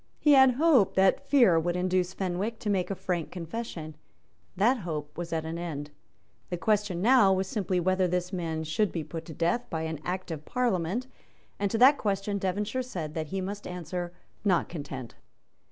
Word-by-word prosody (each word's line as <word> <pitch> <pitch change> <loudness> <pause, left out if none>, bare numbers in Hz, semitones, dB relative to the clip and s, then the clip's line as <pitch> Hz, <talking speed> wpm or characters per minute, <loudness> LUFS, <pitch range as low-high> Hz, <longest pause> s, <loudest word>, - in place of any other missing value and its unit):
He 295 - +3
had 265 -2 +7
hoped 280 - +4
that 190 +8 +3
fear 235 - +6
would 175 +2 -1
induce 180 0 +1
Fenwick 195 +4 -2
to 210 -4 0
make 185 -3 0
a 195 - -2
frank 175 -3 -2
confession; 170 -3 -6 0.6
that 235 +7 +4
hope 155 -7 -5
was 170 -1 -5
at 160 -1 -1
an 165 +1 -4
end; 150 -4 -5 0.6
the 175 - -2
question 205 -2 0
now 240 -4 +6
was 190 0 +1
simply 190 -2 -1
whether 185 +1 +2
this 180 +1 -2
man 165 -3 -2
should 165 +6 0
be 165 - -3
put 160 +2 -7
to 160 - -9
death 175 +10 0
by 160 -1 -2
an 160 -2 -3
Act 185 0 -3
of 155 -2 -5
Parliament; 220 0 0 0.5
and 200 0 +1
to 225 - -1
that 265 +5 +7
question 200 0 -1
Devonshire 205 +6 -1
said 175 -12 -5
that 155 -1 -3
he 190 +4 -3
must 200 +2 -5
answer, 175 0 -4 0.3
"Not 185 -5 +2
Content." 140 -7 -6
185 Hz, 185 wpm, -28 LUFS, 165-210 Hz, 0.6 s, had